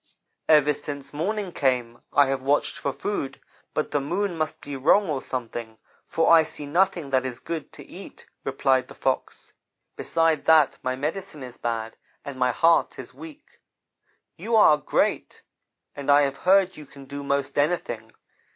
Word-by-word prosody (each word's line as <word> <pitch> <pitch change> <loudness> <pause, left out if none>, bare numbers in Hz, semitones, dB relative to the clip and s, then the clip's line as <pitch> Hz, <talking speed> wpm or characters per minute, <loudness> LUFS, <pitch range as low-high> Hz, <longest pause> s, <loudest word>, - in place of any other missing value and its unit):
"'Ever 150 -1 +5
since 140 -1 -6
morning 195 +5 -2
came 125 -6 -1
I 145 - +5
have 135 0 -2
watched 140 +2 +1
for 140 - -2
food, 145 -4 -4 0.4
but - - -1
the 145 - +1
moon 180 +6 -2
must 155 -1 -3
be 145 -1 -7
wrong 165 +9 +3
or 145 -4 -2
something, 115 -3 -5 0.3
for 165 - +2
I 165 - +8
see 150 -1 -7
nothing 170 -1 +1
that 130 -1 +2
is 130 -2 -5
good 165 -3 -6
to - - -12
eat,' - - -12 0.2
replied 130 -1 +1
the - - -13
Fox. 130 -1 -3 0.4
'Besides 165 -2 0
that, 155 -3 +5
my 130 0 -2
medicine 155 +2 -4
is 125 -1 -10
bad 115 -1 -4 0.3
and 140 -2 -7
my 125 0 +3
heart 165 +7 +2
is - - -9
weak. 310 -2 -13 0.8
You 230 - -1
are 205 -8 +7
great, - - -1 0.5
and 140 0 -6
I 145 0 +6
have 135 -1 -1
heard 190 +1 +3
you 150 -2 -11
can 140 0 -13
do 140 +1 -7
most 140 -1 -1
anything. 120 -8 -1
145 Hz, 170 wpm, -25 LUFS, 130-165 Hz, 0.8 s, I